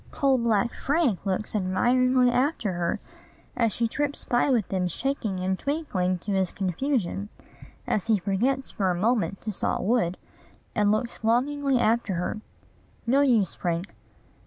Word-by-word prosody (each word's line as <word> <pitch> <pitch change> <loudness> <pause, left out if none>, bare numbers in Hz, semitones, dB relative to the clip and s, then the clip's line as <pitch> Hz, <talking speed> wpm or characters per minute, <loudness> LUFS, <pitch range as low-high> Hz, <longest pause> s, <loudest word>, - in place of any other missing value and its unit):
Coal 270 -2 +2
black 235 0 +1
Frank 280 - 0
looks 195 +3 -1
admiringly 250 +6 +3
after 250 - 0
her 175 -1 -1 0.6
as 230 -3 +2
she 230 +3 0
trips 290 +4 -2
by 240 +3 +2
with 235 -8 +2
them 185 -2 0
shaking 215 - -2
and 190 0 -1
twinkling 195 - -1
to 195 +4 -5
his 190 -2 +1
confusion, 200 - -2 0.6
as 210 - -1
he 220 -2 +4
forgets 230 +9 0
for 195 -2 0
a 180 - +1
moment 210 +1 0
to 215 - -3
saw 195 - -1
wood, 190 -5 +1 0.6
and 205 -1 +2
looks 235 +2 -2
longingly 270 +4 +2
after 225 -4 +1
her. 180 +5 -3 0.6
No 265 +4 +3
use, 230 -9 +3
Frank. 175 +2 -3
225 Hz, 150 wpm, -26 LUFS, 190-255 Hz, 0.6 s, he